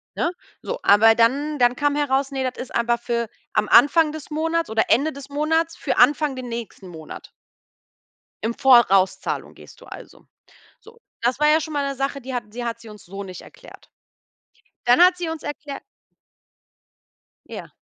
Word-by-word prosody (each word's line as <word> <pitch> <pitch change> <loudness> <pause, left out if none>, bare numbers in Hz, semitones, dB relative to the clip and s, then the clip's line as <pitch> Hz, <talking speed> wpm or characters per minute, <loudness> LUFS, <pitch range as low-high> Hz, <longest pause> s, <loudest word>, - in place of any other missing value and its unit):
ne? 345 - -1 0.3
So, - - -5
aber 220 +2 +6
dann 280 +6 +1
dann 245 0 +3
kam 290 +1 0
heraus, 275 -1 0
ne, 265 -1 -3
das 250 - -10
ist 255 - -9
einfach 235 0 +1
für 235 -1 -3 0.2
am 215 -1 0
Anfang 300 +5 +5
des 310 -1 -9
Monats 325 +2 -1
oder 220 0 +1
Ende 285 +7 +2
des 280 0 -11
Monats 320 +3 -1
für - - -3
Anfang 295 -2 +3
den 255 -1 -7
nächsten 230 -5 -7
Monat. 160 -2 -11 1.1
Im 230 +2 -2
Vorauszahlung 225 -8 +3
gehst - - -16
du - - -15
also. - - -13 0.5
So, 465 +1 -18 0.2
das 240 +2 0
war 300 0 +3
ja 310 +1 +4
schon 310 +1 -6
mal 285 -1 -1
'ne 275 - -3
Sache, 275 +1 -3
die 260 +1 -7
hat 215 -4 -5
sie 240 +2 -6
hat 230 0 -4
sie 230 - -13
uns 210 -1 -13
so 195 +3 -8
nicht 185 -2 -9
erklärt. - - -16 0.9
Dann 245 +4 +4
hat 360 +1 +6
sie 350 -2 -4
uns 320 -1 -6
erklärt 290 -1 -7 1.6
Ja. - - -9
265 Hz, 180 wpm, -22 LUFS, 235-300 Hz, 1.6 s, aber